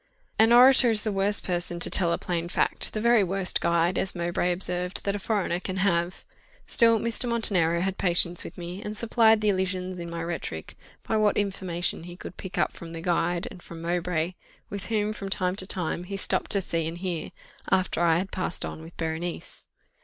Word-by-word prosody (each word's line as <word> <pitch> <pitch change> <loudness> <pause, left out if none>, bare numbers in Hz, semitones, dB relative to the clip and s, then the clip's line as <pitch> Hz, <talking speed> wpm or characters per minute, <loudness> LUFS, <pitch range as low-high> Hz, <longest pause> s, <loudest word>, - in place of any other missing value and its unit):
An 225 +1 +6
orator 250 +1 +7
is 215 -2 +4
the 215 - -1
worst 200 +1 +2
person 175 -1 -1
to - - +3
tell 170 -2 +4
a - - +1
plain 175 -1 -3
fact; - - 0
the 215 - -2
very 235 -1 +4
worst 190 0 -1
guide, 170 +1 +2
as 190 - -1
Mowbray 175 +1 0
observed, 180 0 -1
that 200 0 -1
a - - -3
foreigner 195 -4 -1
can 185 0 -5
have. 180 -2 0 0.4
Still 230 -2 +4
Mr. 235 +3 -1
Montenero 180 -8 +2
had 190 +1 -2
patience 175 -1 +3
with 165 - -10
me, 175 +2 -6
and 210 0 -5
supplied 225 -1 +4
the 210 - +2
elisions 185 -1 -1
in 170 0 -6
my 170 0 -4
rhetoric, 165 - -5 0.3
by 220 - +1
what 215 -1 +2
information 185 -4 -1
he 175 0 -10
could 185 - -9
pick 190 -2 -8
up - - +1
from 165 -1 -10
the 165 - -6
guide, 175 +3 0
and 185 -4 -12
from 170 -1 -10
Mowbray, 175 0 -1 0.4
with 200 0 -5
whom, 215 -1 0
from 195 -2 -6
time 185 -1 -1
to 185 - -4
time, 175 -1 -3
he 195 +1 -5
stopped - - 0
to 200 -2 +1
see 165 -2 -1
and 165 +1 -5
hear, 175 -2 -4 0.4
after 185 -3 +1
I 165 -1 +4
had 190 +2 -3
passed 185 -2 -2
on - - -7
with 165 +1 -13
Berenice. 165 +1 -5
180 Hz, 205 wpm, -26 LUFS, 170-205 Hz, 0.4 s, orator